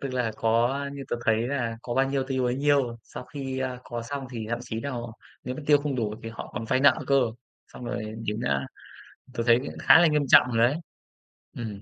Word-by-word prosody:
Tức 140 - -3
là 120 -3 0
có 115 +1 +3
a, 140 +2 -2
như 140 -1 -7
tớ 120 - -1
thấy 110 +1 +2
là 120 -5 -2
có 120 - -4
bao 135 0 +2
nhiêu 135 -1 +1
tiêu 130 -1 -1
bấy 125 0 +1
nhiêu. 140 -4 +2
Sau 125 - -9
khi, 135 -2 -5
a, 130 -1 -3
có 120 -1 -5
xong 135 +2 -5
thì 115 -3 -5
thậm 120 - 0
chí 110 -1 -5
nà 140 - -4 0.5
nếu 125 +1 -3
mà 155 - -7
tiêu 145 -1 +6
không 145 -1 -2
đủ 105 -3 -1
thì 115 - -5
họ 115 - -8
còn 115 - -4
vay 130 +3 +1
nợ 140 +2 +6
cơ, 140 -1 +4 0.5
xong 125 - -11
rồi 110 -3 -4
đến, 105 +2 -2
a 70 -1 0 0.7
tớ 115 - -1
thấy 120 0 +6
cũng 140 - -6
khá - - +7
là 175 - +6
nghiêm 150 -2 +2
trọng - - +8
rồi 115 - 0
đấy. 145 - -2 0.8
Ừm. 105 -4 -6
125 Hz, 245 wpm, -26 LUFS, 115-140 Hz, 0.8 s, trọng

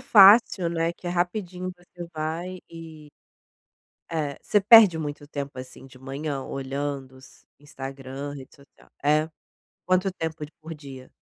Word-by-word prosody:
fácil, 205 -6 +7
né, 165 0 0
que 175 - -12
é - - -1
rapidinho, 180 +1 -2
você 175 0 -11
vai 165 +4 -4
e 160 -2 -11 1.0
Eh, 150 -4 -2
você 210 - +2
perde 205 -4 +8
muito 145 -1 -5
tempo, 140 -2 -6
assim, 130 +1 -10
de 130 -1 -16
manhã, 135 +1 -4
olhando 135 -1 -4
s 130 - -18
Instagram, 135 0 -7
rede 135 -2 -11
social 140 0 -22
é? 155 +2 +2 0.6
Quanto 185 +1 +2
tempo 160 -3 -4
d 150 - -13
por 160 +1 -8
dia? 135 -4 -11
155 Hz, 145 wpm, -25 LUFS, 140-175 Hz, 1.0 s, perde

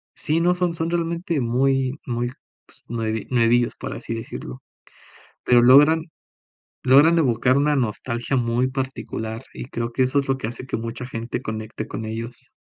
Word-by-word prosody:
sí, 160 0 +2
no 175 +1 +4
son 180 -1 0
son 165 0 -2
realmente 170 -2 -1
muy 130 +3 +1
muy 120 0 -2 0.3
pues, - - -16
nue 110 -1 -2
nuevillos 120 0 +3
para - - -5
así - - -5
decirlo, 90 - -7 0.8
pero 120 -1 +5
logran 150 +6 +6 0.8
logran 145 +6 +6
evocar 130 -2 +3
una 145 +1 +2
nostalgia 120 +2 -2
muy 120 +1 +1
particular 120 -3 -4
y - - -7
creo 115 -2 -4
que 130 - +1
eso 130 +3 +2
es 140 - -3
lo 135 0 +1
que 110 - -4
hace 120 +2 -6
que - - -2
mucha 115 +2 -5
gente 115 -1 -4
conecte 110 0 -5
con 110 - -5
ellos. 115 +4 -7
125 Hz, 165 wpm, -23 LUFS, 115-140 Hz, 0.8 s, logran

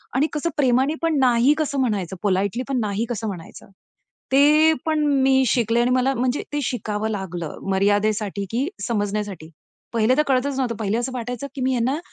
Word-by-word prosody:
आणि 290 +4 +3
कसं 300 +3 -1
प्रेमाने 265 +2 +3
पण 325 -3 +1
नाही 250 +2 +4
कसं 285 -3 -1
म्हणायचं? 200 -7 -1
पोलाईटली 200 +5 0
पण 260 -2 0
नाही 210 +2 -1
कसं 225 -2 -3
म्हणायचं? 185 0 -8 0.6
ते 305 +3 +6
पण 315 -1 +1 0.2
मी 265 0 +4
शिकले 230 +1 +2
आणि 245 - +2
मला 255 +2 +2
म्हणजे 250 +3 -1
ते 295 - 0
शिकावं 220 -3 -2
लागलं, 180 -6 -5
मर्यादेसाठी 205 +1 +1
की 255 +6 0 0.2
समजण्यासाठी. 205 -6 -3 0.4
पहिले 230 +3 +3
तर - - +5
कळतच 270 +1 +1
नव्हतं. 245 -4 -1
पहिले 215 +1 0
असं 250 +2 -2
वाटायचं, 245 +3 -4
की 265 - -5
मी 260 0 +1
यांना 255 +4 0
240 Hz, 175 wpm, -22 LUFS, 205-265 Hz, 0.6 s, ते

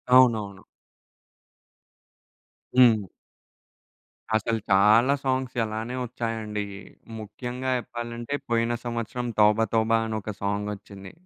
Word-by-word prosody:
అవునవును. 110 -6 +4 2.2
హ్మ్. 110 -5 +6 1.3
అసలు 110 +1 0
చాలా 110 +7 +6
సాంగ్స్ 130 -1 -1
అలానే 110 +3 -4
వచ్చాయండి. 115 -3 -3 0.6
ముఖ్యంగా 125 +4 -5
చెప్పాలంటే, 120 +1 -6 0.2
పోయిన 115 0 +1
సంవత్సరం 120 +1 -3
'తోబతోబా' 110 +1 +3
అని 110 -1 -3
ఒక 105 - -5
సాంగొచ్చింది. 100 -1 -4
115 Hz, 80 wpm, -26 LUFS, 105-120 Hz, 2.2 s, హ్మ్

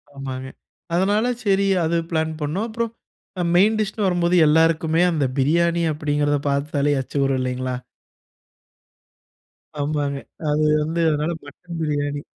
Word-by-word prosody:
ஆமாங்க. 130 -1 -5 0.5
அதனால 205 +5 +2 0.2
சரி 195 0 +3 0.2
அது 170 +1 +1
பிளான் 160 -1 0
பண்ணோம். 180 +10 -1
அப்புறம் 230 0 -2 0.6
மெயின் 210 +5 +4
டிஷ்ன்னு 210 -1 -1
வரும்போது 175 -1 +2
எல்லாருக்குமே, 160 +1 +3
அந்த 155 -4 +1
பிரியாணி 170 +5 +2
அப்படிங்கிறத 145 -1 0
பார்த்தாலே 140 +1 0
எச்சி 130 - -7
ஊரும் 135 -1 +1
இல்லைங்களா? 130 0 -2 2.1
ஆமாங்க. 145 -1 -1 0.3
அது 150 +1 +2 0.2
வந்து 160 +3 -2
அதனால 150 +2 0
மட்டன் 170 +4 -10
பிரியாணி. 145 -1 -1
155 Hz, 115 wpm, -22 LUFS, 145-175 Hz, 2.1 s, மெயின்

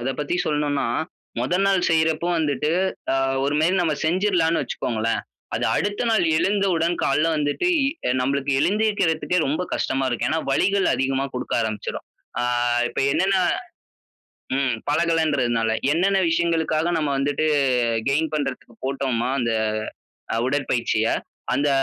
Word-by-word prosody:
அத 125 - -2
பத்தி 150 +4 -1
சொல்லணுன்னா, 150 -1 0 0.6
மொத 130 +9 0
நாள் 190 -2 +2
செய்றப்போ 160 +1 +2
வந்துட்டு, 150 -1 0 0.4
அ - - +2 0.3
ஒருமாரி 155 +6 +2
நம்ம 160 -3 +1
செஞ்சிர்லான்னு 175 -1 +2
வச்சுக்கோங்களேன்! 115 -1 -2 0.3
அது - - -1
அடுத்த 205 +4 -1
நாள் 220 -5 +3
எழுந்த 200 +4 +1
உடன் 165 +1 +1
கால்ல 150 +4 +2
வந்துட்டு, 145 - 0 0.2
இ 275 - -2
நம்பளுக்கு 140 +1 0
எழுந்திருக்கிறதுக்கே 185 -2 +1
ரொம்ப 155 +6 -1
கஷ்டமா 135 0 -1
இருக்கும். 120 - -1
ஏன்னா, 160 +1 +1
வலிகள் 190 +7 +2
அதிகமா 135 0 0
குடுக்க 125 - -3
ஆரம்பிச்சிரும். 110 -1 -4 0.3
ஆ - - 0 0.5
இப்ப - - -3
என்னன்னா 190 +3 +2 1.1
ம். 135 -2 +1 0.2
பழகலன்றதுனால. 145 -8 +1 0.2
என்னென்ன 190 +4 +2
விஷயங்களுக்காக 165 -1 +1
நம்ம 150 -3 0
வந்துட்டு 145 +2 0 0.6
கெயின் 155 +2 +1
பண்றதுக்கு 135 -5 -4
போட்டோம்மா, 130 -3 -1
அந்த 115 - 0 0.8
அ - - 0
உடற்பயிற்சிய, 125 -5 0 0.5
அந்த 145 +1 +1
155 Hz, 125 wpm, -23 LUFS, 135-170 Hz, 1.1 s, நாள்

